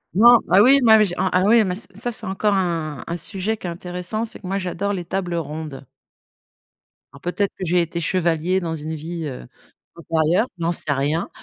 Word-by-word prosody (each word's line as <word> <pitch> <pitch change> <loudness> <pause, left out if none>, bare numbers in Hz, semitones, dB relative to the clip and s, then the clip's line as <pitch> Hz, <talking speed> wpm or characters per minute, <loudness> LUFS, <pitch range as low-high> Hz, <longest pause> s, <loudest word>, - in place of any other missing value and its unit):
Non, 235 +3 +7
ah 190 - +7
oui 270 +5 +7 0.4
ah 185 -1 +2
oui, 225 +1 +5
mais 180 -2 -1
ça 205 - -7
c'est 240 +3 -3
c'est 225 -1 -1
encore 200 +2 0
un 165 -7 -2
un 170 - -3
sujet 200 +5 -3
qui 190 - -11
est - - -2
intéressant, 180 +5 -4
c'est 225 - -9
que 200 - -13
moi, 195 +2 -1
j'adore 200 +2 -2
les 175 -3 -4
tables 180 -1 -3
rondes. 155 -4 -5 1.3
Alors, 140 - -14
peut-être 195 +3 -1
que 190 - -6
j'ai 175 +2 +2
été 170 +1 -3
chevalier 175 +1 +1
dans 165 -2 -3
une 160 +1 -5
vie, 165 +2 -5
heu, 125 - -7 0.5
antérieure, 165 +5 +1
j'en 170 0 0
sais 155 -3 -1
rien. 145 +4 0
175 Hz, 195 wpm, -21 LUFS, 160-200 Hz, 1.3 s, Non